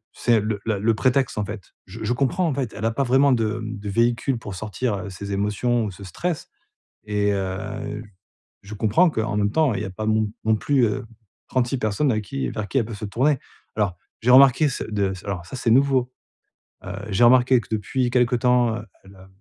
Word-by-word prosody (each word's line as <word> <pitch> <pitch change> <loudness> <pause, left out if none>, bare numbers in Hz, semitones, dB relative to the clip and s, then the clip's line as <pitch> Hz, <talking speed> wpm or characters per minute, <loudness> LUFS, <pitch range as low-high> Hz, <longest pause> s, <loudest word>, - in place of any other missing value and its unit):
c'est 120 -2 +3
le 105 0 -2
la 110 -3 0
le 110 +3 +2
prétexte 130 +1 +1
en 105 - 0
fait. 105 -2 -8
Je 105 +4 -9
je 110 +3 0
comprends 140 +8 0
en 155 - 0
fait. 130 -5 -3
Elle 105 - -4
a 115 - +2
pas 140 +5 0
vraiment 135 +2 +4
de, 115 -2 0
mmh, 110 0 -5
de 100 0 -6
véhicule 120 +4 +1
pour 100 -4 -7
sortir, 110 +3 -2
heu, 100 +1 -6
ces 100 +2 -6
émotions 105 +4 0
ou 105 - -4
ce 95 +2 -12
stress, 160 - -4 0.6
et 105 -1 +1
heu, 105 +2 -4 0.6
je 105 +2 -9
comprends 115 - +3
qu'en 110 -5 -2
même 105 -1 +1
temps, 150 -6 +2
il 95 - -2
y - - -4
a 95 - -5
pas 110 +3 -5
non 110 0 +2 0.2
non 110 0 +3
plus, 135 +2 +2
heu, 105 - -2 0.4
36 130 0 0
personnes 110 +5 0
avec 110 -1 -2
qui 65 -7 -3
vers 105 -1 -4
qui 135 - +1
elle 120 - +1
peut 115 - -7
se 105 - -7
tourner. 135 +7 +1 0.4
Alors 100 -5 0 0.2
j'ai 120 +3 +1
remarqué 135 +3 +7
ce 125 - -4
de 100 -3 -1
s 95 - -10
alors 100 -4 -4
ça 130 - -7
c'est 120 - 0
nouveau. 130 -1 +3 0.7
Heu, 90 - -5 0.2
j'ai 100 +4 +2
remarqué 125 +1 +5
que - - -17
depuis 120 +4 -1
quelque 125 0 +3
temps, 120 -2 +2
heu, 110 - -8 0.2
elle, 95 0 -16
heu, 95 0 -15
110 Hz, 225 wpm, -23 LUFS, 105-125 Hz, 0.7 s, remarqué